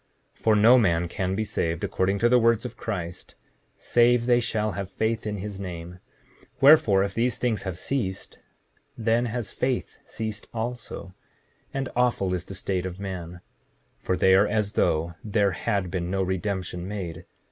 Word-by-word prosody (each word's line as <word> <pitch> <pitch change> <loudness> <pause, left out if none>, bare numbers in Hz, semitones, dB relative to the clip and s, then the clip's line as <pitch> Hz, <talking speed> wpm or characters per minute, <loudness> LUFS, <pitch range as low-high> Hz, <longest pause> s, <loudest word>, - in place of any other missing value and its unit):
7:38 - - -26
For 110 -1 +4
no 115 +5 +7
man 85 -5 +2
can 95 +2 -2
be 110 - 0
saved, 85 -5 -2
according 95 +2 0
to 115 - +3
the 125 +1 +5
words 115 0 +3
of 120 -1 -6
Christ, 90 -7 -5 0.4
save 120 0 +3
they 120 -1 +4
shall 110 -2 -1
have 100 -1 -5
faith 110 +1 -1
in 105 -1 -2
his 100 0 -6
name; 90 -2 -7 0.6
wherefore, 135 -9 +6
if 100 -1 -3
these 120 +3 0
things 115 -5 0
have 95 -3 -5
ceased, 95 -3 -3 0.6
then 115 +1 +1
has 115 -1 -4
faith 130 -1 -2
ceased 110 -1 -5
also; 115 -4 -5 0.6
and 135 -1 -2
awful 120 -7 +1
is 90 -1 -3
the 95 - -8
state 95 -1 -2
of 90 +1 -8
man, 90 -3 -6 0.6
for 95 - -1
they 95 +1 +5
are 100 +2 +5
as 105 -1 0
though 80 +2 +1
there 100 -2 +2
had 95 +1 -1
been 90 -2 -2
no 95 +1 0
redemption 95 -1 -3
made. 90 -6 -6
100 Hz, 170 wpm, -26 LUFS, 95-115 Hz, 0.6 s, no